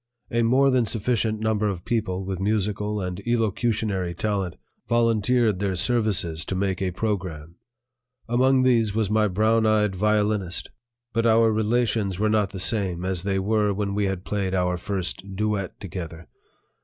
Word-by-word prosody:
A 115 - +1
more 130 +4 +4
than 125 -3 +2
sufficient 110 +1 0
number 110 -1 +1
of 90 -3 -5
people 95 -5 -1
with 95 -1 -4
musical 105 +1 -1
and 90 0 -4
elocutionary 110 -5 0
talent 100 -2 -2 0.3
volunteered 115 -2 +2
their 100 -2 -1
services 95 -7 +1
to 95 - -3
make 95 -1 -1
a 95 - +1
program. 90 -5 -4 0.7
Among 130 +2 +3
these 115 -5 +2
was 110 -2 0
my 110 0 +3
brown 110 +3 +2
eyed 105 -2 +2
violinist. 105 -2 0 0.4
But 115 0 +2
our 115 0 +4
relations 110 -3 0
were 110 +2 +1
not 105 -3 +2
the 95 - -7
same 90 -3 -1
as 95 -2 0
they 95 +1 -1
were 105 +1 +1
when 100 0 -2
we 105 0 0
had 95 -1 -3
played 95 -2 -1
our 90 -1 +1
first 95 +1 -4
duet 105 -2 -2
together. 85 -3 -7
105 Hz, 155 wpm, -24 LUFS, 95-110 Hz, 0.7 s, more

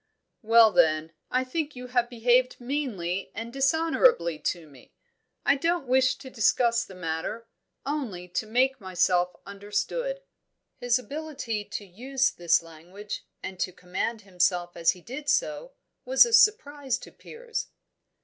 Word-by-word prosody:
"Well, 225 0 +6
then, 160 -3 +3 0.2
I 255 +1 +1
think 295 +3 -3
you 250 0 -8
have 245 -1 0
behaved 245 +2 +2
meanly 240 -9 -3
and 230 +1 -6
dishonourably 275 - +2
to 165 +1 -3
me. 140 -4 -18 0.5
I 280 - +5
don't 335 +2 0
wish 255 0 +3
to 260 - -12
discuss 235 +1 +2
the 190 - -12
matter, 175 +6 -4 0.4
only 250 -12 -4
to 215 +5 -3
make 255 +3 +1
myself 180 -1 +1
understood." 210 - -3 0.5
His 245 0 +2
ability 270 -6 -5
to 205 - -6
use 260 +7 -1
this 170 -1 +2
language, 175 +6 -9 0.2
and 190 -1 -7
to 185 - -1
command 185 +6 -4
himself 180 -2 0
as 170 -1 +3
he 180 - -15
did 280 - -6
so, 305 - 0 0.3
was - - +6
a 470 - -4
surprise 290 - +3
to - - -12
Piers. 465 0 -6
235 Hz, 140 wpm, -27 LUFS, 180-275 Hz, 0.5 s, Well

